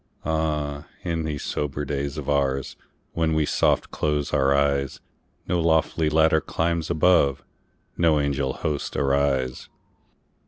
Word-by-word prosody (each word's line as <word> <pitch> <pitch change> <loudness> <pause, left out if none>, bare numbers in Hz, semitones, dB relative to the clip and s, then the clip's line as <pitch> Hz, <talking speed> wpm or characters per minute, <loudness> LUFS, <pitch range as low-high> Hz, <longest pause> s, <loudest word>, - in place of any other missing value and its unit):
Ah, 75 -2 -2 0.2
in 80 -2 -2
these 75 -3 -4
sober 75 0 -3
days 70 0 -3
of - - -5
oursWhen 70 +3 -2
we 80 -1 +2
soft - - +1
close 75 -1 -1
our 70 +1 +3
eyes, 70 -1 +1 0.5
No 90 -1 +1
lofty 80 -1 +2
ladder 80 0 +3
climbs 85 +1 -1
above, 80 -5 +3 0.5
No 80 -3 +3
angel 70 -2 -1
hosts 75 -2 -3
arise. 70 -2 0
75 Hz, 120 wpm, -24 LUFS, 70-80 Hz, 0.5 s, our